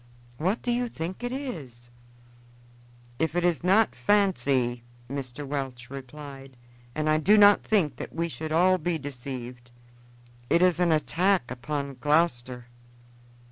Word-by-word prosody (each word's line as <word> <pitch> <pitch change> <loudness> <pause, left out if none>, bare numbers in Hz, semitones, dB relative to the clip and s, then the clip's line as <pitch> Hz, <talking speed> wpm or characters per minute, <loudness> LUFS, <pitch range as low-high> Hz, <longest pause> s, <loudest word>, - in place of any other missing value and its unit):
What 185 +8 0
do 245 - 0
you 245 0 0
think 180 +4 -6
it 245 - -2
is?" 140 - -7 1.3
"If 160 0 0
it 175 - +1
is 175 -2 +1
not 200 +5 +4
fancy," 135 -12 +1 0.3
Mr. 135 +1 -6
Welch 135 -3 -5
replied, 135 -1 -10 0.4
"and 155 0 -1
I 155 0 +3
do 205 +7 +5
not 205 0 +7
think 190 -9 +1
that - - -7
we 170 +1 -2
should 155 +1 -6
all 185 +3 +4
be 175 +1 -1
deceived, 125 -3 -7 0.8
it 170 - +4
is 180 -2 +3
an 175 -2 +3
attack 170 -1 +1
upon 140 +2 -4
Gloucester." 125 -3 0
155 Hz, 140 wpm, -27 LUFS, 130-180 Hz, 1.3 s, not